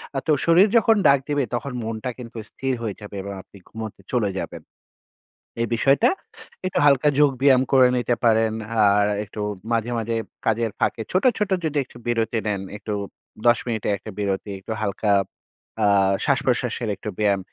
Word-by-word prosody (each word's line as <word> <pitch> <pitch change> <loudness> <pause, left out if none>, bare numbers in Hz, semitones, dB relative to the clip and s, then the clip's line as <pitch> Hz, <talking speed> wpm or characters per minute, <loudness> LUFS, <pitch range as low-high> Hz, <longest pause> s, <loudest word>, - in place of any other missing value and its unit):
আ - - 0
তো - - +3
শরীর 170 +5 +6
যখন 225 0 +4
ডাক 140 0 +6
দিবে 145 -1 +1
তখন 135 +3 -4
মনটা 110 +2 -4
কিন্তু 120 -1 -9
স্থির 135 -1 -3
হয়ে 110 -4 -3
যাবে 105 0 -9
এবং 100 0 -6
আপনি 100 - -18
ঘুমোতে 110 -3 -7
চলে 110 -5 +1
যাবেন। - - -6 1.0
এ - - +3
বিষয়টা 140 - +4 0.6
একটু 185 - 0
হালকা 145 +1 +5
যোগ 145 -1 +5
ব্যায়াম 135 -2 +6
করে 130 -1 +7
নিতে 120 0 +1
পারেন। 110 -1 +3 0.3
আর 100 0 +4 0.2
একটু 105 +1 -8 0.3
মাঝে, 115 +1 0
মাঝে 115 +1 -2 0.3
কাজের 115 0 +1
ফাঁকে 115 - 0
ছোট, 185 - +1
ছোট 210 -2 -1
যদি 155 -1 -1
একটু 120 - -16
বিরতি 115 -1 0
নেন, 100 -2 -1 0.2
একটু 105 +1 -5 0.5
১০ 120 0 +6
মিনিট 110 -3 -2
এর 105 - +2
একটা 110 - -9
বিরতি, 100 0 -2
একটু 105 - -9
হালকা 100 0 0 0.7
আ - - +4 0.4
শ্বাসপ্রশ্বাসের 125 -4 0
একটু 105 - -6
ব্যায়াম। 100 -2 +2
115 Hz, 170 wpm, -23 LUFS, 105-135 Hz, 1.0 s, করে